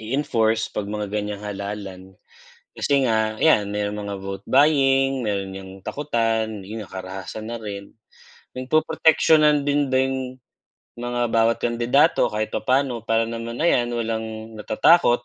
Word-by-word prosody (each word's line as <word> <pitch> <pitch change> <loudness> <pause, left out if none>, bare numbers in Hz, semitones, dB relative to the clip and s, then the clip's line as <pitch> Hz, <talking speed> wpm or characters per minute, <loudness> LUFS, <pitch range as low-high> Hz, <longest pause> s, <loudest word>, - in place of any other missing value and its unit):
i-enforce 115 -2 0
pag 100 - -4
mga 105 0 -3
gan'yang 105 -1 -3
halalan. 100 -2 -7 0.6
Kasi 140 -2 +1
nga 110 -1 0
'yan, 105 -11 +3
merong 105 0 -2
mga 100 -1 -5
vote 95 0 -6
buying, 135 -2 +3
meron 100 -3 -3
'yang 95 -1 -9 0.2
takutan, 115 -7 -1
yun 110 +1 -6
na 100 - -13
karahasan 95 +3 -7
na 115 0 -6
rin. 100 -1 -7 0.6
Napoproteksiyonan 150 +2 +3
din 145 0 +1
din 130 0 +1 0.8
yung 120 +1 -6
mga 120 0 -2
bawat 115 0 +3
kandidato 120 +7 +3
kahit 110 0 -3
papa'no 130 -2 0
para 115 0 +2
naman 115 +1 -5
ayan, 120 -8 +3
walang 110 -1 -4
natatakot 120 +1 +3
115 Hz, 135 wpm, -23 LUFS, 105-130 Hz, 0.8 s, yan